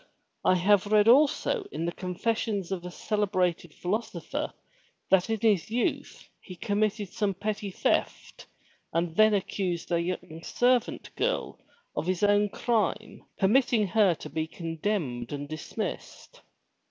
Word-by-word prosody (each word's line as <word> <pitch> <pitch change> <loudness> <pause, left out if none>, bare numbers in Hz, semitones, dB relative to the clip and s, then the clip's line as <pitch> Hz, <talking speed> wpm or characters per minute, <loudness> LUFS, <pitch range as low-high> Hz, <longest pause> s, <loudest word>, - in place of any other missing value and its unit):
"I 185 - +4
have 195 +2 +3
read 210 0 +4
also 300 - +4
in 165 - -3
the 170 - -1
confessions 195 +2 -2
of 185 -3 -3
a 180 - -5
celebrated 185 -4 -1
philosopher 205 +9 -3 0.6
that 190 +2 +4
in 225 -1 0
his 210 -6 +2
youth 235 +2 -2
he 185 - -11
com 205 +4 -2
mitted 215 -2 0
some 200 0 -1
petty 210 +1 -3
theft 185 - -1 0.4
and 165 0 -1
then 215 0 +5
accused 185 -3 -2
a 170 -1 +2
young 170 -2 -5
servant 245 -1 +1
girl - - -1 0.4
of 150 +3 -2
his 185 +1 0
own 205 0 +4
crime, 220 -1 -1
permitting 225 +1 +3
her 205 -4 +4
to - - -9
be 160 0 -2
condemned 165 - -3
and 145 0 -4
dismissed." 155 +1 -6
200 Hz, 140 wpm, -28 LUFS, 175-215 Hz, 0.6 s, then